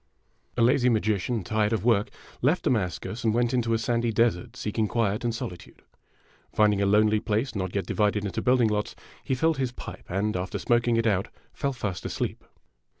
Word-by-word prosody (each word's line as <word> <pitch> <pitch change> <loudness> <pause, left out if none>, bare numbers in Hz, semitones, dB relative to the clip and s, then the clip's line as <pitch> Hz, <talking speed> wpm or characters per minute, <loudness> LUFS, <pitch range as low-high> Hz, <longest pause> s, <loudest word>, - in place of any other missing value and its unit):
'' - - -38
A 120 - +4
LAZY 125 +1 +4
magician, 110 -1 0
tired 105 +2 0
of 110 -2 -1
work, 115 -1 +3 0.3
left 150 +8 +2
Damascus 110 +1 -1
and 110 -1 +2
went 120 +1 +1
into 120 -2 +1
a 115 - +3
sandy 115 +1 0
desert, 110 -5 +1
seeking 105 +1 -1
quiet 110 -1 0
and 120 - +1
solitude. 90 -6 -7 0.7
Finding 105 -2 +3
a 100 - +2
lonely 105 +1 +4
place 110 +5 -1
not 95 -3 -3
yet 100 - 0
divided 105 -1 0
into 95 - -3
building 125 -2 +3
lots, 105 0 -2 0.3
he 130 - -1
filled 160 +3 +1
his 130 -2 0
pipe, - - -9
and, 100 +3 -1
after 90 +1 -3
smoking 120 -1 +2
it 115 - +1
out, 100 -3 +1 0.3
fell 140 -2 -1
fast 100 -8 -4
asleep. - - -3
110 Hz, 190 wpm, -26 LUFS, 105-120 Hz, 0.7 s, A